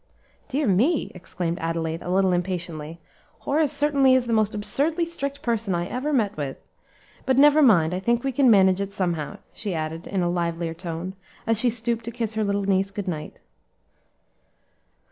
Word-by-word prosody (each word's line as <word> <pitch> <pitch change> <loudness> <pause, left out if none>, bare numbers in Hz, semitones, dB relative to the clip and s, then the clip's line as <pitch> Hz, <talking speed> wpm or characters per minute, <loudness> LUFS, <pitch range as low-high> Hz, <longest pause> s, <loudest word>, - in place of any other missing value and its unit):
"Dear 290 +1 -1
me!" 245 - +2
exclaimed 175 -1 -4
Adelaide, 165 0 -2
a - - -6
little 190 0 +3
impatiently; 170 -3 -3 0.4
"Horace 295 0 +1
certainly 280 -3 +3
is 255 -1 +2
the 235 - -1
most 215 -1 +2
absurdly 305 +11 0
strict 280 -4 -5
person 225 -5 0
I 175 0 -1
ever 255 +9 -3
met 225 -8 +1
with. 140 -3 -4 0.7
But 260 -1 +3
never 295 +2 +6
mind, 180 - +5
I 180 - -1
think 235 +4 +1
we 270 - 0
can 265 0 +4
manage 190 -3 +5
it 200 0 -3
somehow," 170 -6 -2 0.2
she 200 -5 -4
added, 160 +1 -4
in 190 -3 -1
a - - +1
livelier 170 -1 -2
tone, 170 +2 -5 0.3
as 225 -2 +2
she 245 - +3
stooped 235 0 -2
to 235 - -4
kiss 230 -2 -3
her 220 0 0
little 200 0 0
niece 195 0 +1
good 200 0 -6
night. 155 -4 -5
200 Hz, 180 wpm, -24 LUFS, 175-250 Hz, 0.7 s, never